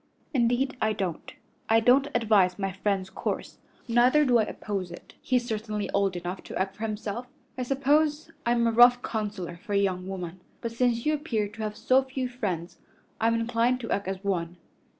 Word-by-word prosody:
"Indeed 250 +1 +2
I 215 0 +2
don't. 185 -6 -4 0.4
I 225 0 +6
don't 255 +5 +4
advise 210 -6 +3
my 195 -1 -2
friend's 190 0 -1
course; - - -4 0.3
neither 250 +5 +4
do 245 -3 +4
I 220 - +3
oppose 195 -4 -4
it. 175 - -12
He's 250 -2 +1
certainly 215 -2 -3
old 200 -2 +1
enough 175 +2 -4
to - - -6
act 190 +1 -1
for 225 - -3
himself. 215 +3 -4 0.3
I 255 - -4
suppose 295 +4 +1
I'm 235 0 +2
a 230 - +3
rough 245 +2 +6
counselor 205 -6 -4
for 205 +4 -6
a - - +3
young 185 -2 0
woman, 185 -2 -6 0.2
but 230 - -4
since 235 0 +1
you 305 - +3
appear 245 -9 -1
to 220 - -10
have 210 -1 -3
so 260 +1 +4
few 265 -1 -3
friends 195 -9 -4 0.4
I'm 230 +1 +3
inclined 230 +2 +1
to 230 - -5
act 200 -1 -1
as 190 0 -4
one. 175 -3 -2
220 Hz, 190 wpm, -27 LUFS, 195-245 Hz, 0.4 s, I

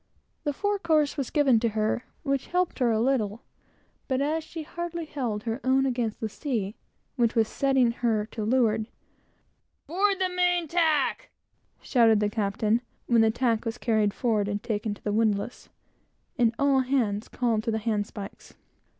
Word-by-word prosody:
The 295 - +1
fore 410 +7 -1
course 310 -5 +2
was 275 -4 -3
given 275 -6 +4
to 230 0 +1
her, 215 +3 0 0.2
which 275 -2 -1
helped 360 -3 0
her 250 -2 +3
a 220 - +1
little; 230 -3 0 0.6
but 260 -1 0
as 310 +3 0
she 325 0 -7
hardly 340 +1 -5
held 240 -9 -3
her 230 +3 -3
own 265 +1 +3
against 240 -4 -1
the 220 - -2
sea 220 -4 -3 0.4
which 235 -2 +2
was 225 -2 +3
settling 270 -3 +2
her 225 -3 0
leeward 220 -1 +1 1.0
"Board 390 +4 +1
the 375 - +2
main 360 -2 +1
tack!" 325 - +1 0.5
shouted 225 -4 +4
the 210 0 0
captain; 215 +2 0 0.2
when 235 -2 +4
the 225 - +5
tack 230 -1 0
was 230 0 -3
carried 215 -4 +1
forward 215 -3 0
and 205 0 -3
taken 210 -1 -2
to - - -21
the 205 - -1
windlass, 215 +1 0 0.7
and 235 -1 +2
all 280 -1 +3
hands 245 -6 0
called 235 -3 0
to - - 0
the 220 - 0
handspikes. 210 -2 -4
240 Hz, 165 wpm, -27 LUFS, 220-285 Hz, 1.0 s, the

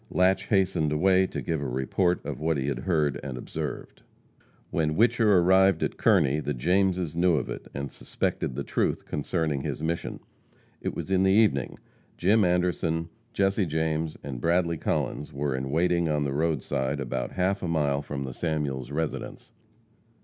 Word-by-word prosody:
Latche 95 +2 +2
hastened 95 -7 +2
away 95 +4 +3
to - - -5
give 80 -3 -2
a 70 - -2
report 65 +8 0
of - - -4
what 80 0 0
he 65 - -2
had 65 - -2
heard 75 -2 0
and 65 -3 -5
observed. - - -6 0.7
When 75 -1 0
Whicher 115 +1 +3
arrived 95 +2 +4
at - - -1
Kearney 70 +3 +3
the 75 -2 -2
Jameses 90 +3 +1
knew 85 0 +3
of 70 - -2
it, - - -7
and 70 0 -4
suspected 65 - -3
the - - -3
truth - - -1
concerning 75 -1 -1
his 75 - -4
mission. 85 +1 -2 0.6
It - - -3
was - - -5
in 95 -1 +3
the 95 - +4
evening. 100 - +2 0.4
Jim 105 +5 +4
Anderson, 90 -2 0 0.2
Jesse 95 -1 +1
James 80 0 -1
and 65 -4 -6
Bradley 85 0 +1
Collins 75 0 -2
were 70 0 -2
in 65 +1 -3
waiting 85 +2 +2
on 75 -1 +1
the 70 -1 -2
roadside, 70 -3 -1
about - - -3
half 95 +2 0
a 90 - -2
mile 75 -4 +1
from 70 -1 -5
the 65 -2 -5
Samuels 70 -5 -2
residence. 75 +1 -4
80 Hz, 170 wpm, -27 LUFS, 70-90 Hz, 0.7 s, arrived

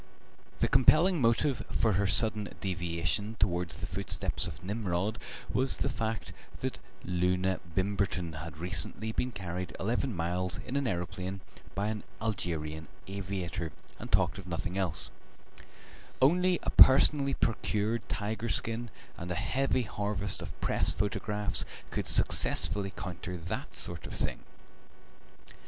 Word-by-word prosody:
The - - +4
compelling 155 +6 +5
motive 120 +3 +2
for 110 -3 +2
her 100 +2 +2
sudden 105 +1 +3
deviation 90 +3 -1
towards 90 -4 0
the 95 +5 -5
footsteps 95 0 +1
of 95 - -9
Nimrod 100 0 -1 0.3
was 130 +1 +5
the 135 - 0
fact 110 -2 -3 0.3
that - - -2 0.3
Loona 90 +1 +1 0.2
Bimberton 95 -4 0
had 80 -1 -7
recently 95 +5 -3
been 125 +3 -1
carried 90 -3 -5
eleven 120 +3 0
miles 90 +2 0
in 130 - -4
an 140 -2 +1
aeroplane 90 0 -3 0.3
by 100 +3 0
an 110 -1 -3 0.2
Algerian 80 -7 -3 0.2
aviator, 95 -4 -3 0.3
and - - -8
talked - - +3
of 95 - -10
nothing 90 +1 -3
else; 90 -6 -2 1.1
only 180 +6 +4
a - - -1
personally 140 +1 +7
procured 110 0 0
tiger 110 +3 -2
skin 115 +2 +1 0.3
and 85 - -6
a 90 - -1
heavy 130 +7 +1
harvest 100 -2 0
of - - -8
Press - - +2
photographs 105 +2 +1 0.3
could - - -2
successfully 100 -1 +2
counter 90 -1 -6
that 85 0 -5
sort - - -2
of - - -7
thing. - - -2
100 Hz, 130 wpm, -31 LUFS, 90-115 Hz, 1.1 s, personally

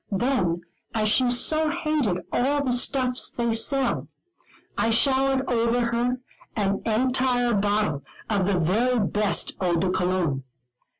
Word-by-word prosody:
Then, 195 -6 0 0.3
as 215 -1 +2
she 250 +3 +3
so 310 +6 +2
hated 300 - -1
all 280 +3 +1
the 260 - 0
stuffs 250 0 0
they 235 -1 -1
sell, 270 +4 0 0.7
I 230 - +1
showered 265 +3 +2
over 235 0 +1
her 245 +2 0 0.4
an 200 -2 0
entire 245 +1 +1
bottle 205 -7 0 0.3
of 200 -4 0
the 200 -2 +1
very 225 +9 +1
best 205 -3 0
Eau 175 -2 +1
de 180 +2 0
Cologne. 180 -7 -1
235 Hz, 130 wpm, -24 LUFS, 195-255 Hz, 0.7 s, she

